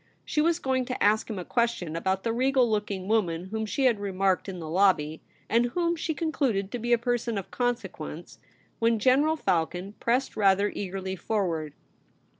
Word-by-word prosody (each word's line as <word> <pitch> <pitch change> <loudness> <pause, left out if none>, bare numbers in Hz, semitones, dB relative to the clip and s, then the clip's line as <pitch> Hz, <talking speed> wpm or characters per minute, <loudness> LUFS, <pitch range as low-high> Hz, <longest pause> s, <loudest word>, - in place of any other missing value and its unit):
She 300 - +1
was 330 +1 +3
going 260 -5 0
to 255 - -3
ask 215 +2 +3
him 215 - -4
a 180 - -5
question 235 -9 -1
about 190 +3 -1
the 230 - 0
regal 260 +1 +3
looking 205 -3 -2
woman 185 -5 0
whom 220 +1 -3
she 270 +5 0
had 235 -5 +3
remarked 195 -1 0
in 185 - -5
the 165 -2 -6
lobby, 160 -3 +2 0.3
and 235 +1 +3
whom 340 +7 0
she 320 -1 -3
concluded 265 - -1
to 245 - -3
be 240 +2 -2
a 240 - +6
person 235 -1 -1
of 195 - -6
consequence, 195 -10 -4 0.4
when 230 0 +3
General 275 +8 +3
Palcon 180 - -1
pressed 250 +3 0
rather 200 0 +3
eagerly 190 -1 -4
forward. 170 -7 -2
215 Hz, 180 wpm, -27 LUFS, 190-245 Hz, 0.4 s, a